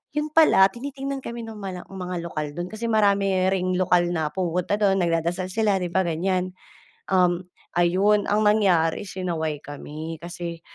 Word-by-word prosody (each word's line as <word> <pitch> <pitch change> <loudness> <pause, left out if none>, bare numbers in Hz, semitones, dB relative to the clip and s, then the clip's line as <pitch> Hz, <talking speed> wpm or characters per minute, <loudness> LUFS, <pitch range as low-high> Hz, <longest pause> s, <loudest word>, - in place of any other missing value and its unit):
'yon 300 0 0
pala 310 -12 +6
tinitingnan 270 +3 -6
kami 235 0 -6
no'ng 225 -1 -8
mala 185 -3 -6
mga 180 -2 -5
lokal 155 -3 -3
do'n 175 +1 -4
kasi 220 +4 -8
marami 200 -2 +3 0.2
ring 185 -1 0
lokal 175 -1 +3
na 160 -3 0
pumupunta 180 +3 -1
do'n 195 -2 +2
nagdadasal 170 +1 0
sila, 210 -2 +1
'di 180 - -2
ba, 190 +1 +2
ganiyan, 180 +2 -1 0.6
um, 180 -1 +2 0.3
ayon, 195 +4 +3
ang 210 +1 +2
nangyari 190 -4 +2
sinaway 165 -5 -2
kami 155 +2 -7
kasi 170 -1 -6
185 Hz, 155 wpm, -24 LUFS, 170-205 Hz, 0.6 s, pala